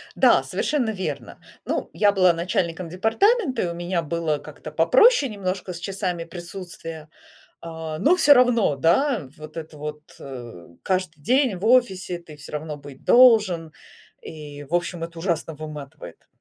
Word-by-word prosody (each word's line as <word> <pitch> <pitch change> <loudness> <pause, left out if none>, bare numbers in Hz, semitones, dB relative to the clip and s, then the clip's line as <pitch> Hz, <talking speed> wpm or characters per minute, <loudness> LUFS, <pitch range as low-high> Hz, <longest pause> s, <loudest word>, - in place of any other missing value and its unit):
Да, - - +5
совершенно 270 -7 -1
верно. 190 -3 -5 0.3
Ну, - - -2
я 205 -1 +4
была 185 -3 +4
начальником 170 0 -2
департамента, 265 - +1
и - - -1
у 170 - -4
меня 175 +1 -2
было 165 -1 -1
как-то 155 +1 -10
попроще 255 - +4
немножко 185 -2 -4
с 170 - -8
часами 185 -2 -3
присутствия, 170 -2 -9 0.5
а. 160 -2 -6
Но 330 +6 +4
всё 295 -5 +6
равно, 245 - +3
да, 175 - +2
вот 155 +1 -11
это 155 -1 -8
вот, 150 0 -6 0.2
э, 120 -9 -9 0.2
каждый 185 -5 -2
день 255 - +2
в 190 - -5
офисе 195 -7 +2
ты 155 -3 -14
всё 145 - -12
равно 150 0 -4
быть 140 -2 -13
должен 210 -10 +5 0.5
и, 145 -2 -9
в 165 +5 -2
общем, 175 -1 -2
это 165 0 -8
ужасно 165 -3 -2
выматывает. 150 -2 -10
170 Hz, 155 wpm, -23 LUFS, 155-200 Hz, 0.5 s, всё